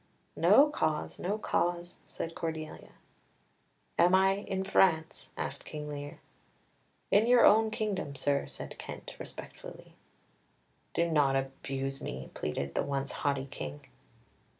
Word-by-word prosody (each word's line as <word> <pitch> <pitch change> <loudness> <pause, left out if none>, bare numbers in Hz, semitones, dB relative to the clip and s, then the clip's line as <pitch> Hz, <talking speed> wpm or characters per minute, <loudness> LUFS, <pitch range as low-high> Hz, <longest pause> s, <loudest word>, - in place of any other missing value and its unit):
"No 285 - +7
cause, 155 - -1
no 200 +4 -1
cause," 175 -4 -1
said 165 - -5
Cordelia. 160 -2 -5 1.1
"Am 180 +2 +6
I 190 +1 +4
in 190 -1 -3
France?" 160 -4 +2
asked - - -4
Lear. 150 -1 -6 0.9
"In 210 +3 +5
your 245 -1 +7
own 220 +1 +6
kingdom, 200 -9 -2
sir," 140 0 0
said - - -8
Kent - - -8
respectfully. - - -9 1.0
"Do 170 - +3
not 145 -3 +3
abuse 135 0 -3
me," 65 +1 -6
pleaded 70 -2 -3
the - - +1
once 140 -1 -2
haughty 140 -1 -1
King. 75 - -7
155 Hz, 120 wpm, -31 LUFS, 135-190 Hz, 1.1 s, No